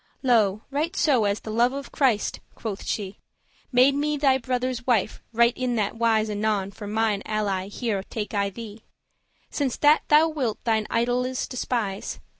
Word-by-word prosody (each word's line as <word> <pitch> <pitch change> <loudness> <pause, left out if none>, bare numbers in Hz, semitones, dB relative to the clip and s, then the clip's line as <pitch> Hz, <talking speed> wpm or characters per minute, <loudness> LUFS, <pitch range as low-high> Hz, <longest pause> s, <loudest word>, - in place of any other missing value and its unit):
"Lo, 220 -5 +3
right 315 +6 -1
so 260 - +3
as 200 +1 0
the 220 - -6
love 240 +3 +2
of 280 0 -6
Christ," 250 -8 +1 0.2
quoth 215 -3 -5
she, 200 -2 -4 0.5
"Made 255 +2 +5
me 295 +1 0
thy 270 -2 +3
brother's 255 0 -2
wife, 220 -4 +1
right 235 +1 +3
in 255 -1 -1
that 210 0 -1
wise 225 -1 +2
Anon 205 -2 -1
for 205 +1 -9
mine 215 -1 0
ally 200 -3 -1
here 205 -1 -2
take 210 +1 -6
I 200 -1 +1
thee, 215 +1 -9 0.7
Since 275 -4 -1
that 295 +1 +5
thou 305 +2 +6
wilt 260 -9 -2
thine 220 -2 +1
idoles 245 +2 0
despise. 230 -6 -3
230 Hz, 165 wpm, -25 LUFS, 210-255 Hz, 0.7 s, thou